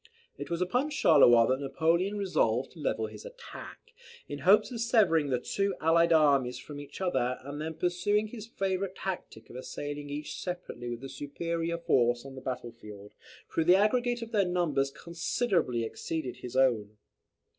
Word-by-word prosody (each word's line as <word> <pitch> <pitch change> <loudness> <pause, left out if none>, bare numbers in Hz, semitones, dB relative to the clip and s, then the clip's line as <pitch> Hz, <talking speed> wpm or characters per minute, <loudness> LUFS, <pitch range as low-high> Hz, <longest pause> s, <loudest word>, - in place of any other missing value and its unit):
It - - -7
was 170 +1 -2
upon 250 +11 0
Charleroi 140 - +6
that 130 +1 +1
Napoleon 165 +8 +1
resolved 135 - +1
to 170 - -15
level 110 -6 -1
his 110 -1 -9
attack, - - -11 0.3
in 145 - -6
hopes 195 - +4
of 235 -2 -4
severing 205 - +3
the 125 - +2
two 195 +9 -1
allied 170 +1 +4
armies 140 -6 +4
from 145 -1 -9
each 145 +4 -10
other, 130 -9 0
and 145 +2 -6
then 160 +1 -4
pursuing 180 +5 +1
his 220 -2 -8
favourite 195 -3 -2
tactic 185 -13 -6
of - - -12
assailing 145 +3 -6
each 150 +1 -5
separately 175 -9 -5
with 120 +2 -6
a 135 - -6
superior 165 +5 -3
force 120 -6 +2
on 135 - -9
the 130 - -9
battle 125 -2 -4
field, 105 -3 -12 0.4
though 165 - +3
the 175 +3 +6
aggregate 240 +4 +2
of 230 - -9
their 200 -4 +2
numbers 165 -6 +1
considerably 170 - -1
exceeded 130 +4 -4
his 125 0 -8
own. 110 -6 +2
160 Hz, 170 wpm, -29 LUFS, 130-185 Hz, 0.4 s, Charleroi